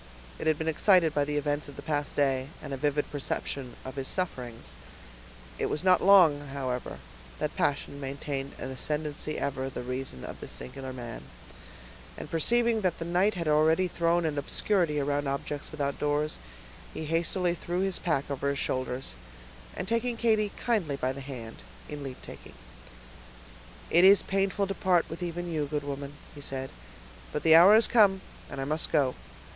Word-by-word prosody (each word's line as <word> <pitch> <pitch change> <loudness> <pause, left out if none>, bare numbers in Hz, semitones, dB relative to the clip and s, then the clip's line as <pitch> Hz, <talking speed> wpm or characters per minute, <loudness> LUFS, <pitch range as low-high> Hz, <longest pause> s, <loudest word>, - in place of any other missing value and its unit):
It - - -3
had 155 -1 +3
been 160 - -3
excited 165 0 +4
by 145 -1 +2
the 150 0 -2
events 145 0 -1
of 145 - -10
the - - -9
past 145 -2 -2
day, 135 -2 +1 0.2
and 140 - -5
a - - -2
vivid 145 +1 0
perception 140 -2 -3
of 130 +1 -7
his 135 -1 -2
sufferings. 125 -11 -4 0.9
It - - +1
was 150 - -2
not 185 -1 +5
long, 180 -7 +7
however, 130 -3 -4 0.4
that - - -3
passion 140 0 -1
maintained 140 0 -4
an 130 - -5
ascendency 150 +2 -3
ever 135 -1 -2
the 130 - -6
reason 125 - -5
of - - -8
this - - -5
singular 130 0 -5
man; 120 -3 -7 1.0
and - - -8
perceiving 230 +6 +3
that 185 -4 0
the 165 - -5
night 180 +5 +2
had 170 -3 -3
already 160 +4 +4
thrown 170 0 +1
an 150 -2 0
obscurity 165 +1 +1
around 145 0 0
objects 140 +1 -3
without 140 -3 -3
doors, 150 +1 0 0.6
he 160 - -4
hastily 170 +3 +1
threw 175 +1 -3
his 195 -1 0
pack 145 -6 0
over 140 0 -1
his 140 - -1
shoulders, 130 - -2 0.6
and 180 - -4
taking 230 +2 0
Katy 215 -3 +2
kindly 200 - 0
by 130 -1 -1
the 140 - -8
hand, 125 -5 -8 0.3
in 150 -1 -6
leavetaking,— 135 -2 -9 1.4
"It 170 +2 +6
is 195 +1 +8
painful 195 +1 0
to 195 - -3
part 180 -3 +2
with 165 - -6
even 175 0 -3
you, 150 -3 -1
good 145 0 -2
woman," 140 0 -5 0.2
he 145 - -10
said, 135 -1 -5 0.6
"but 150 - -3
the 160 - +6
hour 180 +6 +9
has 225 0 +5
come, 200 -5 +5 0.3
and 140 - -6
I 135 - -2
must 155 +3 -1
go. 140 -5 +3
150 Hz, 175 wpm, -29 LUFS, 140-175 Hz, 1.4 s, hour